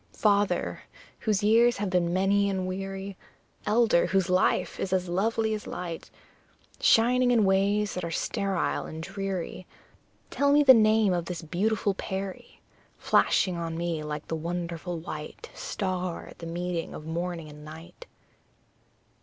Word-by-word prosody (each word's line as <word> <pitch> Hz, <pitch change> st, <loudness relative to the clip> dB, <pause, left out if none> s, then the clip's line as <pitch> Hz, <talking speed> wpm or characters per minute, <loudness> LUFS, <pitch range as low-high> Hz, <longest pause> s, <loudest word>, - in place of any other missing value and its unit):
Father, 205 Hz, -1 st, +1 dB, 0.4 s
whose 210 Hz, -2 st, 0 dB
years 230 Hz, +3 st, +4 dB
have 200 Hz, -2 st, -2 dB
been 175 Hz, -2 st, +1 dB
many 200 Hz, +2 st, +2 dB
and 190 Hz, -1 st, -2 dB
weary 195 Hz, +1 st, -5 dB, 0.5 s
Elder, 215 Hz, -4 st, +3 dB
whose 190 Hz, -2 st, +1 dB
life 185 Hz, -, +1 dB
is 185 Hz, -, -2 dB
as 185 Hz, -1 st, +1 dB
lovely 220 Hz, +5 st, 0 dB
as 215 Hz, -, -5 dB
light 170 Hz, -2 st, -6 dB, 0.7 s
Shining 245 Hz, +2 st, +4 dB
in 230 Hz, -4 st, +4 dB
ways 200 Hz, +2 st, +2 dB
that 180 Hz, -, -4 dB
are 170 Hz, -, -3 dB
sterile 195 Hz, +2 st, -1 dB
and 160 Hz, +1 st, -7 dB
dreary 195 Hz, -1 st, -4 dB, 0.6 s
Tell 280 Hz, 0 st, +2 dB
me 295 Hz, +1 st, +5 dB
the 265 Hz, -2 st, +9 dB
name 215 Hz, -3 st, +4 dB
of 175 Hz, -1 st, -1 dB
this 175 Hz, -1 st, -5 dB
beautiful 200 Hz, +5 st, 0 dB
peri, 190 Hz, 0 st, -6 dB, 0.4 s
Flashing 185 Hz, -2 st, +2 dB
on 165 Hz, -1 st, -4 dB
me 170 Hz, -2 st, -2 dB
like 150 Hz, 0 st, -5 dB
the 165 Hz, -, -2 dB
wonderful 170 Hz, +1 st, -4 dB
white 155 Hz, -2 st, -8 dB
Star, 185 Hz, -3 st, -3 dB
at -, -, -15 dB
the 165 Hz, -, -7 dB
meeting 175 Hz, 0 st, -3 dB
of 150 Hz, -, -9 dB
morning 170 Hz, 0 st, -4 dB
and 150 Hz, 0 st, -12 dB
night. 160 Hz, -, -11 dB
185 Hz, 145 wpm, -27 LUFS, 170-205 Hz, 0.7 s, the